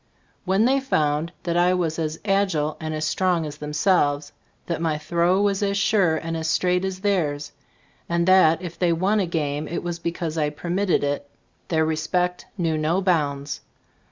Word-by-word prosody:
When 195 +4 +3
they 270 +2 +3
found 155 - 0
that 170 -1 -1
I 175 +1 +4
was 165 -3 -1
as 155 0 -2
agile 190 -7 +1
and 155 0 -4
as 155 0 -2
strong 180 -1 +1
as 150 0 -7
themselves, 150 -1 +1 0.3
that 170 -2 -3
my 160 -2 0
throw 170 +4 +1
was 200 -1 +1
as 200 -1 0
sure 195 -5 +3
and 165 +1 -4
as 160 0 -2
straight 180 +3 +1
as 190 -1 -3
theirs, 155 -8 0 0.6
and 170 0 +1
that 185 -2 +5
if 175 -2 -7
they 175 -2 +3
won 190 +6 +1
a 190 - 0
game 150 -3 -2
it 170 - -4
was 175 -1 -4
because 170 -1 -3
I 150 -1 +1
permitted 175 +5 0
it, 145 0 -2 0.4
their 160 -2 +2
respect 180 +3 -1
knew 165 -4 0
no 160 +4 +1
bounds. 145 -6 0
170 Hz, 180 wpm, -23 LUFS, 155-185 Hz, 0.6 s, that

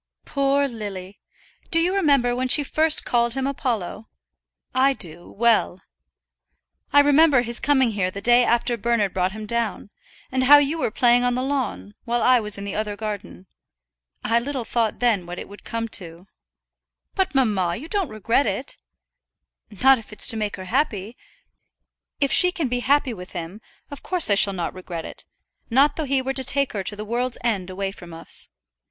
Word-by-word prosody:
"Poor 280 0 +1
Lily! 200 -5 -8 0.5
Do 330 - +2
you 345 +3 +2
remember 280 -10 +2
when 255 +1 -1
she 290 +3 +5
first 310 +2 +2
called 235 0 +1
him 265 -1 -2
Apollo? 235 -6 -3 0.6
I 265 +2 +3
do, 175 -7 -10
well. 225 -5 +1 1.1
I 285 - +7
remember 290 -2 +4
his 235 0 -1
coming 265 -5 +2
here 195 -3 -1
the 195 - -7
day 240 +4 +4
after 240 0 +1
Bernard 225 -3 0
brought 185 0 -1
him 215 0 -7
down, 225 -2 -3 0.4
and 260 0 0
how 290 +3 +9
you 290 +3 +1
were - - 0
playing 245 +1 +3
on 245 0 +1
the 255 - -2
lawn, 250 - -3
while 240 0 -1
I 255 -1 +5
was 210 -2 -4
in 200 - -7
the 200 -1 -5
other 210 -1 -3
garden. 210 -3 -7 0.8
I 230 +2 +2
little 260 -1 -4
thought 225 -1 -1
then 215 -8 +1
what 175 +1 -7
it - - -7
would 205 +1 -14
come 230 0 -4
to." 170 -2 -7 0.9
"But, 380 -7 -1
mamma, 200 -9 +1
you 295 - -8
don't 385 -4 -1
regret 225 +5 0
it?" 205 +7 -4 1.1
"Not 265 -1 +6
if 220 - -14
it's 210 - +2
to - - +1
make 210 -2 -2
her 185 - -9
happy. 225 -2 -2 1.0
If 280 -1 +1
she 360 -1 +7
can 320 -7 -3
be 245 0 -1
happy 275 0 +1
with 180 -3 -11
him, 175 +4 -7 0.3
of 285 - -8
course 360 - +3
I - - +5
shall 200 0 +4
not 175 -3 -4
regret 180 -3 -7
it; - - -9 0.4
not 275 +4 +3
though 315 - -3
he 270 -1 0
were 270 +1 -2
to 265 - 0
take 275 +1 0
her 200 - -2
to 205 - -2
the 210 +1 -7
world's 240 +3 -2
end 200 -6 -1
away 195 +1 -4
from 175 -4 -12
us. 165 - -6
235 Hz, 190 wpm, -22 LUFS, 200-270 Hz, 1.1 s, how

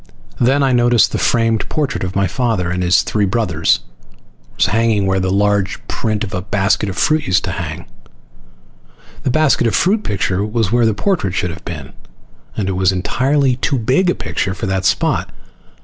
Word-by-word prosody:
Then 135 +4 +3
I 135 - +2
noticed 120 -2 +3
the - - -2
framed 115 -2 +1
portrait 145 -9 -2
of 95 0 -4
my 100 0 +2
father 100 -3 -1
and 90 0 -2
his 90 0 +3
three 105 -2 0
brothers 95 -7 +1 0.7
was - - +2
hanging 110 -2 +1
where 95 0 +1
the 95 0 -1
large 100 0 +1
print 110 -1 -2
of 100 - -6
a 90 - -2
basket 100 +1 0
of 95 - -6
fruit 155 0 +1
used 95 -1 +2
to - - -3
hang. - - -5 1.4
The - - -1
basket 140 -3 +2
of 115 - 0
fruit 210 +4 +2
picture 95 -2 -1
was 110 -1 -1
where 120 -1 +3
the 110 - 0
portrait 135 - -1
should 90 -2 -1
have 80 +3 -10
been, 75 -5 -7 0.6
and 100 - -1
it - - 0
was 95 0 +2
entirely 130 +7 +1
too 140 +2 0
big 130 +11 +1
a - - +1
picture 95 -2 -3
for - - -4
that 95 -1 -1
spot. - - +1
105 Hz, 190 wpm, -17 LUFS, 95-120 Hz, 1.4 s, Then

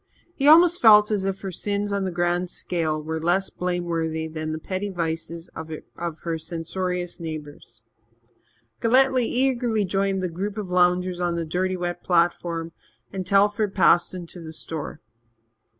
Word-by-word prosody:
He 280 -3 0
almost 340 +3 +7
felt 210 -2 +7
as 200 -2 0
if 195 0 -2
her 195 - -4
sins 205 +3 -2
on 200 -1 0
the 185 - -2
grand 175 +1 0
scale 160 -4 -2
were 160 +1 -3
less 180 +4 +1
blameworthy 170 -3 -2
than 155 0 -4
the 155 - -3
petty 185 +5 -4
vices 165 -1 -4
of 160 0 -7 0.5
her 165 -1 -2
censorious 175 +2 -4
neighbours. 150 -8 -8 1.0
Galletly 255 +1 +4
eagerly 245 -4 +1
joined 195 0 0
the - - +1
group 195 +5 -4
of 200 -4 -5
loungers 180 0 +2
on 175 -1 0
the 170 -1 -2
dirty 185 +3 -1
wet 175 -1 -4
platform, 170 -1 +1 0.4
and 185 -2 -4
Telford 205 +1 +2
passed 185 -2 +4
into 175 0 -8
the 160 -1 -8
store. 160 -1 -6
180 Hz, 150 wpm, -24 LUFS, 165-200 Hz, 1.0 s, almost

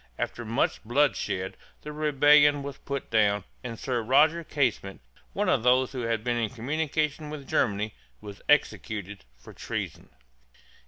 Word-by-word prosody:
After 120 - -3
much 115 +4 -1
bloodshed 120 -6 0 0.3
the 150 - -6
rebellion 145 -1 +4
was 140 0 -7
put 140 -1 -5
down, 105 -3 +3 0.2
and 115 -2 -6
Sir 125 -1 -2
Roger 155 +8 +3
Casement, 125 -10 -1 0.3
one - - -1
of - - +3
those 125 +1 +3
who 130 - -4
had 115 -2 -1
been 120 0 0
in 115 -2 0
communication 150 +4 -2
with 145 -3 -8
Germany, 105 -2 0 0.3
was 105 -1 -10
executed 105 - 0
for - - -14
treason. - - -5
125 Hz, 145 wpm, -27 LUFS, 110-145 Hz, 0.3 s, rebellion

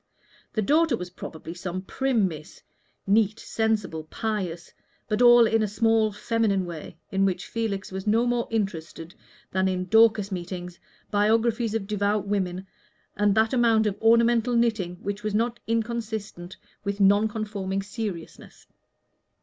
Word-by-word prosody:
The 215 - 0
daughter 305 +1 +3
was 180 -2 -7
probably 160 -2 -8
some 180 +1 -5
prim 245 -2 +1
Miss, 155 -3 -10 0.4
neat, 210 +2 +2
sensible, 210 -8 -1
pious, 185 -3 -4 0.3
but 215 +1 0
all 240 -1 +8
in 225 0 +2
a 215 - +1
small 220 +1 +2
feminine 205 -2 0
way, 170 -1 -8
in 195 0 +1
which 185 -2 0
Felix 215 -5 -3
was 190 +2 -6
no 225 +3 +3
more 240 -1 0
interested 170 -6 -4 0.4
than 190 0 +1
in 185 -1 -1
Dorcas 220 0 +4
meetings, 180 -1 -6 0.3
biographies 225 +2 +2
of 215 -3 -2
devout 205 0 0
women, 190 -2 -2 0.5
and 205 0 +2
that 220 +2 +2
amount 230 -3 +3
of 205 -2 0
ornamental 235 +1 +4
knitting 220 -7 +1
which 200 +1 -3
was 215 -1 -2
not 235 +2 0
inconsistent 220 -5 -3 0.3
with 200 0 -3
Non 205 +2 +5
conforming 205 -3 -3
seriousness. 205 -5 -7
210 Hz, 140 wpm, -25 LUFS, 190-225 Hz, 0.5 s, all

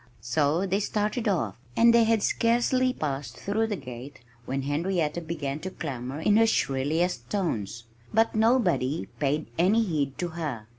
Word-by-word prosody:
So 145 - +1
they 195 +1 0
started 215 +3 -1
off. 150 - 0 0.2
And 235 0 +6
they 235 -1 +5
had 220 -2 +2
scarcely 245 +2 +2
passed 145 - -4
through 220 +3 -1
the 210 - -2
gate 130 -2 -9 0.3
when 135 +1 -2
Henrietta 165 +2 -1
began 155 -3 -4
to 185 - -5
clamor 135 -5 -5
in 210 +5 +4
her 225 0 +5
shrillest 145 - 0
tones. 120 - -2 0.3
But 225 +1 +3
nobody 215 - +2
paid 150 +2 0
any 205 +6 +4
heed 145 -8 -2
to 175 - -2
her. 150 -10 -5
165 Hz, 155 wpm, -27 LUFS, 140-210 Hz, 0.3 s, And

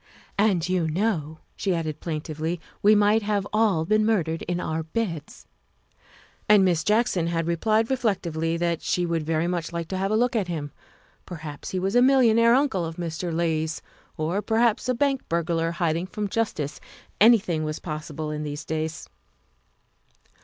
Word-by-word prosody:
"And 195 -5 +2
you 180 -3 +1
know," 160 -3 -1
she 190 -3 0
added 155 -2 -3
plaintively, 160 +1 -3
" - - -31
we 210 +1 +6
might 210 +2 +4
have 205 -1 -1
all 210 -7 +2
been 215 +4 +3
murdered 170 -7 0
in 175 0 -1
our 160 -2 -2
beds. 165 -2 -4 0.4
' - - -32
' - - -30
And 205 -2 +7
Miss 175 -3 +2
Jackson 210 -5 +2
had 165 -1 -1
replied 215 +8 +1
reflectively 170 -9 -1
that 170 -1 -1
she 180 - 0
would 170 -1 -1
very 160 +1 0
much 175 -1 -2
like 170 -1 -4
to 190 - -2
have 195 +1 0
a 215 - +1
look 245 +2 +1
at 205 -5 0
him. 155 -4 -4 0.6
Perhaps 155 -4 -7
he 190 - -3
was 190 +3 -1
a 245 - +6
millionaire 235 -3 +5
uncle 265 -10 +1
of 165 0 -5
Mr. 170 0 -4
Leigh's, 160 -1 -1 0.3
or 165 +6 -1
perhaps 230 +2 +1
a 255 - +2
bank 275 +1 +1
burglar 165 0 0
hiding 170 0 -1
from 210 +2 -3
justice. 175 -10 -2 0.4
Anything 200 -8 +4
was 155 0 -3
pos 155 -1 -6
sible 150 0 -4
in 150 - -4
these 150 0 -5
days. 160 0 -3
175 Hz, 175 wpm, -25 LUFS, 160-210 Hz, 0.6 s, And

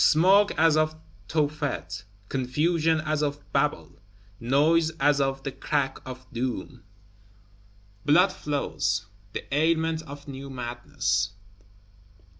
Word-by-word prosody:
Smoke 195 +6 +5
as 160 -1 +5
of 155 0 +2 0.3
Tophet; 145 - -2 0.2
confusion 155 +6 +1
as 155 -1 -1
of 145 -1 -1
Babel; 110 - 0 0.4
noise 150 +7 +3
as 145 0 +4
of 135 0 -1
the 135 - -3
Crack 135 -1 -1
of 130 0 -8
Doom! 125 +1 -3 1.2
Blood 180 +6 +5
flows; 105 -8 -1 0.3
the - - -4
ailment 160 +1 +2
of 145 -1 -10
new 140 0 -7
madness. 120 -5 -1
145 Hz, 105 wpm, -26 LUFS, 130-155 Hz, 1.2 s, Smoke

